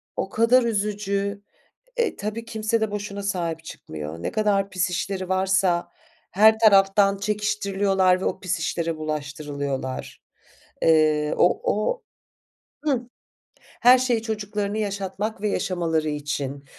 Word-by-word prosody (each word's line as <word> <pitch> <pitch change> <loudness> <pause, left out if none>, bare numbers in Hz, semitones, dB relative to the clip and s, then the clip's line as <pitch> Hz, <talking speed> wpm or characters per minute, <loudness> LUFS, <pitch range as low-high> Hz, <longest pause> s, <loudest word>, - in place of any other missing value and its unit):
O - - -2
kadar 230 +3 +4
üzücü. 200 -2 -1 0.6
E, 470 -2 +1
tabii 215 +2 -5
kimse 220 0 -1
de 220 - 0
boşuna 200 -1 -5
sahip 170 -5 -2
çıkmıyor. 80 - -8
Ne - - -2
kadar 200 -2 +1
pis 185 +1 0
işleri 185 +1 -3
varsa 190 -2 +1 0.4
her 220 +3 +5
taraftan 195 -2 +5
çekiştiriliyorlar 200 -2 +1
ve - - -2
o - - -1
pis 185 -1 -2
işlere 165 0 -2
bulaştırılıyorlar. 145 -3 -4 0.6
Eee, 155 -2 +3
o 175 - +3
o 215 - 0 0.8
Hıh. 275 -5 +2 0.6
Her 250 +2 +4
şey 245 -3 +1
çocuklarını 210 -2 -3
yaşatmak 200 0 -3
ve 210 - 0
yaşamaları 165 -5 -1
için. 145 -1 -4
195 Hz, 120 wpm, -24 LUFS, 165-210 Hz, 0.8 s, her